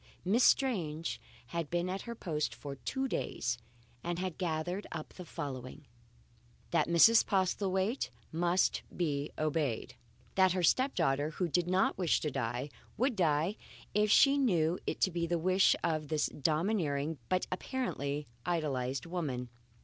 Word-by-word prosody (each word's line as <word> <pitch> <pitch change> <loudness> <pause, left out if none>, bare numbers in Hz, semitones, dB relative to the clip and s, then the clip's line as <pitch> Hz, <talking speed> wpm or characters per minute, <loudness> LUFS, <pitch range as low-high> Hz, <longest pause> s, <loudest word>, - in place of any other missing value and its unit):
Miss 220 +7 +3
Strange 170 - +2 0.3
had 170 -3 -3
been 175 +1 0
at 190 +1 -3
her 235 - -4
post 155 -8 -2
for 140 -1 -7
two 265 - -2
days, 120 - -2 0.4
and 175 0 -2
had 185 -1 -3
gathered 175 +3 -2
up 160 -2 -6
the 180 - -9
following: 140 -1 -6 0.9
That 165 -3 +2
Mrs. 195 +7 +7
Postlethwaite 190 +3 0 0.2
must 175 +3 +2 0.2
be 145 -4 -1
obeyed. 150 -6 -1 0.4
That 190 -1 +4
her 185 -1 -1
step 260 - +3
daughter 145 -3 +1
(who 175 +3 -2
did 175 +1 +1
not 185 +1 +2
wish 175 -4 +3
to 150 - -1
die) 125 +2 -3 0.3
would 255 0 +1
die 165 +2 +1 0.4
if 210 +1 +3
she 275 +6 +6
knew 175 - +2
it - - -2
to 190 - +3
be 170 0 -1
the 175 +1 +1
wish 185 +3 +4
of 155 -3 0
this 155 -1 +1
domineering 155 -2 0
but 185 -1 +1
apparently 150 - -2 0.2
idolized 135 -7 -1
woman. 145 -8 -3
170 Hz, 150 wpm, -32 LUFS, 150-190 Hz, 0.9 s, Mrs